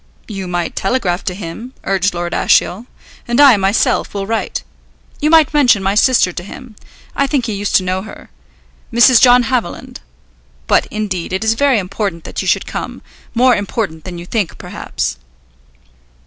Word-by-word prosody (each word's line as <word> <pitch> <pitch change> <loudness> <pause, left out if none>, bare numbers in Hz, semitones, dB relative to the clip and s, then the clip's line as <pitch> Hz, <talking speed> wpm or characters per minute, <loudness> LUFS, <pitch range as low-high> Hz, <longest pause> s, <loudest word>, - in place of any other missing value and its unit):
"You 195 -4 -6
might 175 -1 -3
telegraph 195 -4 -1
to 185 -4 -2
him," 205 +7 -8
urged 195 -1 0
Lord 175 0 -3
Ashiel. 215 +7 +1 0.4
"And 240 +2 0
I, 280 -4 +8
myself, 195 +1 0
will 195 -1 -2
write. 225 +2 -3 0.6
You 300 - +1
might 315 -2 +5
mention 250 -9 +4
my 195 +1 +1
sister 215 -4 +3
to - - -5
him. 230 +3 -11 0.4
I 280 - +1
think 270 -4 0
he 220 - -3
used 205 0 -2
to 190 - +4
know 185 +1 -2
her. 215 - -12 0.6
Mrs. 240 +1 +6
John 250 -1 +6
Haviland. 240 -7 -3 0.7
But, - - +2
indeed, 200 -5 -4
it 190 +3 -1
is 220 0 +2
very 275 +1 +2
important 190 -3 -3
that - - -5
you - - -5
should - - +1
come, - - -6 0.3
more 250 +1 +4
important 200 -6 -3
than 180 -2 -7
you 170 - -8
think, 205 -2 -2
perhaps." - - -4
205 Hz, 170 wpm, -16 LUFS, 185-245 Hz, 0.7 s, I